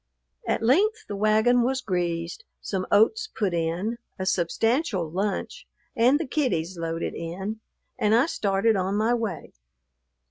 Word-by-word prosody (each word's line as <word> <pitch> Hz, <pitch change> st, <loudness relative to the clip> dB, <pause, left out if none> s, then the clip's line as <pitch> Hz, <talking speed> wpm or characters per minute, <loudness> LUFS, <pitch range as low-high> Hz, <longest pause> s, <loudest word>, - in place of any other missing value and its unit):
At -, -, 0 dB
length 420 Hz, -, +3 dB
the 205 Hz, -, -4 dB
wagon 215 Hz, +4 st, +3 dB
was 260 Hz, +2 st, +1 dB
greased, 175 Hz, -5 st, -2 dB, 0.2 s
some 190 Hz, -2 st, -3 dB
oats 435 Hz, -, +4 dB
put 200 Hz, -5 st, 0 dB
in, 170 Hz, +8 st, -1 dB, 0.2 s
a 190 Hz, -, -3 dB
substantial 190 Hz, -, +1 dB
lunch 195 Hz, +5 st, -3 dB, 0.3 s
and 250 Hz, +5 st, +4 dB
the 330 Hz, -, -2 dB
kiddies 190 Hz, -, -1 dB
loaded 165 Hz, 0 st, -3 dB
in, 190 Hz, +6 st, -5 dB, 0.4 s
and 215 Hz, +1 st, +3 dB
I 240 Hz, +4 st, +5 dB
started 215 Hz, -, +1 dB
on 190 Hz, +1 st, 0 dB
my 220 Hz, +3 st, +2 dB
way. 225 Hz, -8 st, -3 dB
210 Hz, 140 wpm, -25 LUFS, 180-240 Hz, 0.4 s, I